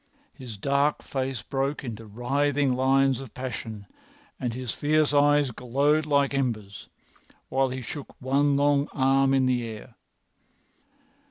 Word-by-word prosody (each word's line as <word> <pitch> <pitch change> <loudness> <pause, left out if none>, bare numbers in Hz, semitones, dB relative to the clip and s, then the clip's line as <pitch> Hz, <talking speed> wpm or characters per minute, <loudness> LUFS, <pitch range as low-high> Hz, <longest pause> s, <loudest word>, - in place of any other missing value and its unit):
His 120 -5 -9
dark 140 +6 +1
face 130 -3 -3
broke 140 +2 -2
into 115 -3 -7
writhing 135 +5 0
lines 135 0 +2
of 135 -3 -10
passion, 115 -5 -6 0.5
and 125 -2 -2
his 125 -1 -4
fierce 150 0 +1
eyes 145 -1 +4
glowed 140 +6 +1
like 140 -1 +2
embers, 105 - -3 0.6
while 135 0 +1
he 130 0 -5
shook 140 +4 -8
one 140 +2 +2
long 145 0 +2
arm 135 0 +3
in 135 -1 +3
the 125 -1 +1
air. 115 +1 -8
135 Hz, 135 wpm, -26 LUFS, 125-140 Hz, 0.6 s, eyes